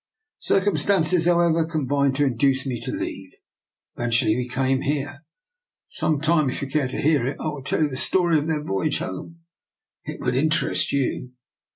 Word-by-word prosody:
Cir - - +2
cumstances, 185 -4 +2
however, 170 -2 +3
combined 140 -4 0
to 145 +1 +2
induce 130 +1 +1
me 125 -3 -3
to - - -3
leave. - - -5 0.6
Eventually 120 -2 +2
we 125 0 -2
came 130 +1 0
here. 145 +1 -3 0.7
Some 155 -2 0
time, 155 -2 +2
if 130 - -4
you - - -3
care 140 -1 0
to 130 - -5
hear 150 -3 +2
it, 135 - -3
I 155 - -2
will 150 -2 -6
tell 150 - 0
you - - +3
the 135 - -6
story 170 +3 +2
of 150 - -4
their 155 -2 -1
voyage 95 -8 -1
home. 165 - -7 0.6
It - - -7
would 125 - 0
in 150 +5 +2
terest 165 +1 0
you.' 130 -2 -2
145 Hz, 185 wpm, -23 LUFS, 130-160 Hz, 0.7 s, however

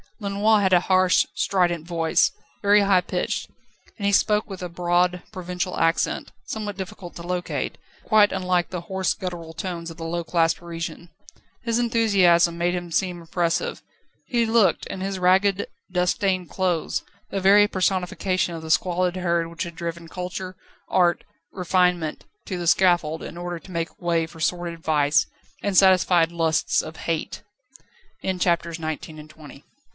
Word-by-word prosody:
Lenoir 205 +1 +2
had 190 -1 +2
a 180 - +7
harsh, 185 0 +3
strident 175 -4 0
voice, 165 -2 +2 0.3
very 205 +1 +5
high 195 -2 +4
pitched, - - -3 0.5
and 200 - -4
he 200 - +3
spoke 210 +1 +2
with 195 -2 -7
a 180 - -4
broad, 175 +1 +1
provincial 180 0 -4
accent, 165 +1 0
somewhat 210 -3 -5
difficult 185 -2 -8
to 170 - -8
locate, 180 0 -3 0.2
but - - -25
quite 215 -2 +6
unlike 180 -2 0
the 180 -2 -4
hoarse, 190 +2 -1
guttural 170 -3 -6
tones 170 0 -5
of 165 - -10
the 165 - -7
low 170 +1 -2
class 165 -1 +2
Parisian. 170 0 -7 0.5
His 230 0 0
enthusiasm 195 -8 +3
made 175 +1 0
him 175 -1 -5
seem 180 +1 0
impressive. 170 0 -1 0.5
He 235 -3 +1
looked, 225 -3 +3
in 190 - -6
his 195 0 -2
ragged, 190 +2 +3 0.2
dust 180 0 +1
stained 185 -3 -1
clothes, 180 -4 -1 0.3
the 195 - -2
very 200 +2 +6
personification 185 -1 0
of 165 - -6
the 160 0 -4
squalid 180 +1 +1
herd 170 -2 0
which 170 0 -5
had 170 -1 -7
driven 170 0 -5
culture, 185 +1 -6 0.3
art, 175 -2 +2 0.3
refinement 180 -3 0 0.2
to 185 - -4
the 175 - -3
scaffold 175 -3 +3
in 170 - -8
order 175 -1 -5
to 185 - -14
make 165 0 -4
way 170 -2 +1
for 165 0 -14
sordid 170 +1 -2
vice, 150 -2 +2 0.4
and 200 -2 -1
satisf 185 -2 +6
180 Hz, 145 wpm, -24 LUFS, 170-190 Hz, 0.5 s, a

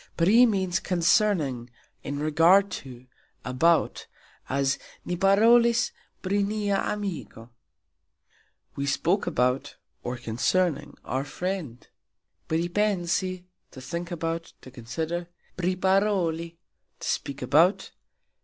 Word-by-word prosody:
"Pri" 220 +9 +6
means 190 -5 0
"concerning, 165 - +1 0.3
in 140 - -5
regard 165 +7 +4
to, 125 -2 -8 0.4
about", 160 +7 +1 0.4
as 140 +1 0 0.3
"Ni 180 - -2
parolis 230 +5 +4 0.3
pri 200 +2 +1
nia 205 0 0
amiko", 180 - -4 1.2
We 140 0 -3
spoke 175 +7 +1
about 125 +2 0 0.3
or 125 +1 -4
concerning 145 +8 -1
our 130 +1 -2
friend. 175 -6 -5 0.6
"Pripensi", 180 +1 0 0.3
to - - -12
think 170 +7 -5
about, 165 -1 -4
to 130 - -12
consider. 160 +9 -4 0.3
"Priparoli", 185 -2 0 0.4
to - - -6
speak 140 -1 -3
about. 160 +9 +3
170 Hz, 100 wpm, -26 LUFS, 140-195 Hz, 1.2 s, Pri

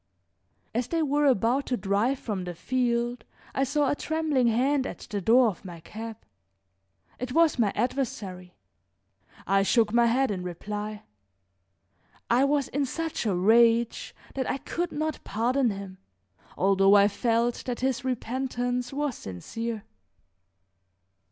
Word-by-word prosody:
As 235 +1 -1
they 330 -1 0
were 290 0 +2
about 255 +2 +2
to 250 - 0
drive 210 +7 +1
from 205 -7 -4
the 175 -1 -5
field 240 +3 -1 0.3
I 270 - +1
saw 285 +2 +1
a 290 - +1
trembling 305 -5 0
hand 260 +4 +2
at - - -6
the 205 -1 -3
door 235 +4 +5
of 185 - -8
my 175 -3 -9
cab; 220 +6 -8 1.0
it 250 0 -4
was 325 -4 +3
my 210 -4 +3
adversary. 205 -7 -3 0.9
I 195 0 +3
shook 220 +2 +2
my 235 0 +5
head 260 +1 +2
in 185 -3 -3
reply; 210 +4 -5 1.3
I 250 +3 +5
was 280 -1 +1
in 280 0 -1
such 325 -4 -3
a 195 - +1
rage 230 +4 +3 0.2
that 265 -2 -2
I - - 0
could 345 +4 -3
not 310 +1 -3
pardon 245 +4 +1
him, 195 -2 -7 0.6
although 195 +1 +4
I 200 0 +7
felt 230 +3 0
that 245 -1 -3
his 260 -1 0
repentance 250 0 -2
was 290 -1 -1
sincere. 215 - -5
240 Hz, 140 wpm, -27 LUFS, 205-265 Hz, 1.3 s, I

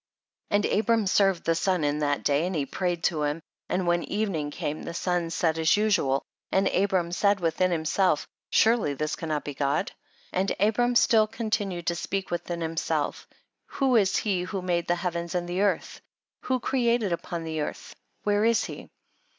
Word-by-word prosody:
14. - - +1 0.2
And - - +3
Abram 225 -1 +2
served 195 -2 +3
the 165 - +2
sun 175 0 0
in 145 +1 0
that 145 -1 0
day 145 +4 +2
and 185 - -3
he 145 -3 0
prayed 175 +1 -2
to 155 -3 +1
him, 150 +2 -1 0.3
and 185 0 0
when 175 0 +2
evening 195 -8 -2
came 145 +1 -4
the 170 - -6
sun 175 -2 -1
set 165 0 0
as 160 +4 +4
usual, 205 -11 +2 0.3
and 190 0 +3
Abram 185 -3 +1
said 200 +3 +2
Avilhin 180 +1 +1
him 160 -2 -1
self, 180 -2 +2 0.2
surely 220 -10 +3
this 155 +2 -2
cannot 155 -3 -3
be 145 - -4
God? 140 +1 0 0.4
15. - - 0
And 195 +1 0
Abram 240 +4 +2
still 220 -2 +5
continued 210 -6 -2
to 170 - +1
speak 195 +3 -3
within 175 0 -3
himself, 165 0 -2 0.4
who 265 -3 +1
is 200 -4 +3
he 195 -4 0
who 185 +1 -4
made 175 -2 0
the 175 - +2
heavens 170 -1 -3
and 175 -1 -1
the 180 +2 -1
earth? 205 - 0 0.4
who 255 0 +1
created 235 -5 +1
upon 170 -1 -4
earth? 155 -2 -4 0.3
where 205 0 +2
is 230 0 +3
he? - - -8
180 Hz, 185 wpm, -27 LUFS, 165-205 Hz, 0.4 s, still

